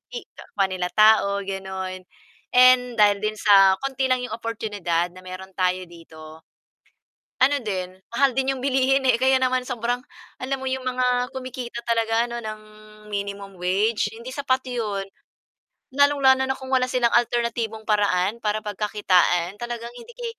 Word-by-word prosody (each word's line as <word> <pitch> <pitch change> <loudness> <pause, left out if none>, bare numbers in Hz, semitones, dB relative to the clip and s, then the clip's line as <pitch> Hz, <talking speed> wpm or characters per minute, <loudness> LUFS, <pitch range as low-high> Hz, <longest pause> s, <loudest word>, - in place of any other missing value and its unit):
i 475 - -4
kapwa 200 -2 -2 0.3
tao 215 -1 +6 0.2
gano'n, 190 -1 -5 0.6
and 255 0 +7 0.2
dahil 205 -1 +5
din 215 0 -1
sa 195 -2 +6
konti 270 -1 -1
lang 255 -1 +1
'yong 250 - -5
oportunidad 205 -7 -2
na - - -11
meron 185 +1 -9
tayo 185 0 0
dito. 160 -1 -13 1.0
Ano 285 +2 +4
din, 185 -4 -4 0.2
mahal 275 0 +4
din 270 +1 0
yung 255 - -8
bilihin 270 0 +2
eh 235 -2 +4
kaya 265 0 +4
naman 255 0 +1
sobrang 245 -1 -2 0.4
alam 265 +1 -2
mo - - -7
yung 260 0 -3
mga 250 0 0
kumikita 255 -2 -6
talaga 230 0 +1
ano 235 0 -5
ng 215 -1 -7 0.5
minimum 200 -1 -5
wage, 200 +5 +1
hindi 235 +3 -8
sapat 260 -1 0
yun. 210 -5 -2 0.9
Lalong-lalo 275 -2 +4
na 265 - 0
kung 265 -1 -10
wala 255 -1 +3
silang 245 -2 +1
alternatibong 235 -2 0
paraan 205 0 +1
para 210 0 0
pagkakitaan 195 -3 +1
talagang 240 0 -6
hindi 350 - -12
ke - - -7
230 Hz, 150 wpm, -23 LUFS, 195-255 Hz, 1.0 s, and